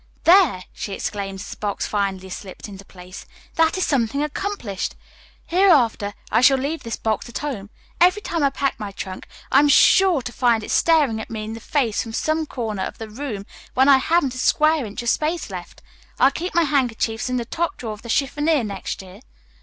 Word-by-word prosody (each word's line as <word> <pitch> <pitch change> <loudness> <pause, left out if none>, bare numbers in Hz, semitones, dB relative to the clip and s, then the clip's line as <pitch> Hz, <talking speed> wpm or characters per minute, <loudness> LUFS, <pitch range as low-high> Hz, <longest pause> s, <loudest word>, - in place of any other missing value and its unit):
"There!" 335 - +5
she 200 - -5
exclaimed 195 -1 -4
as - - -8
the - - -8
box 205 -1 -2
finally 195 -2 -2
slipped 190 +2 -8
into 195 -1 -10
place, 185 -1 -12 0.3
"that 325 +2 +2
is 375 - +1
something 275 +1 0
accomplished. 300 - -4 0.5
Hereafter, 280 - +3 0.2
I 225 - +4
shall 270 +1 +6
leave 285 +5 -3
this 230 -2 -4
box 220 +1 -2
at 235 - -5
home. 240 -9 -5 0.3
Every 365 +4 +4
time 335 - -2
I 280 - +4
pack 275 -1 -2
my 205 -3 -5
trunk 190 -1 -7 0.2
I 270 - +6
am 290 0 +4
sure 350 0 +5
to 245 - -5
find 235 -3 +2
it - - -6
staring 285 -10 +3
me 220 -1 -5
in 215 +1 -5
the 225 - -7
face 235 -2 0
from 225 -2 -7
some 310 +5 0
corner 220 -7 -4
of - - -4
the 220 -1 -8
room 220 -5 -5 0.3
when 265 +2 +4
I 275 -1 +8
haven't 280 -1 +1
a 255 - -6
square 305 -1 +2
inch 205 +3 -6
of 235 - 0
space 315 +6 -1
left. - - -9 0.4
I'll 270 - +5
keep 345 +6 -5
my 340 - +5
handkerchiefs 245 -6 0
in 255 - 0
the 240 - -2
top 330 +7 -2
drawer 225 -3 -5
of 210 - -12
the 235 - -11
chiffonier 295 +3 +1
next 200 -2 -5
year." 185 -1 -13
250 Hz, 205 wpm, -22 LUFS, 210-300 Hz, 0.5 s, I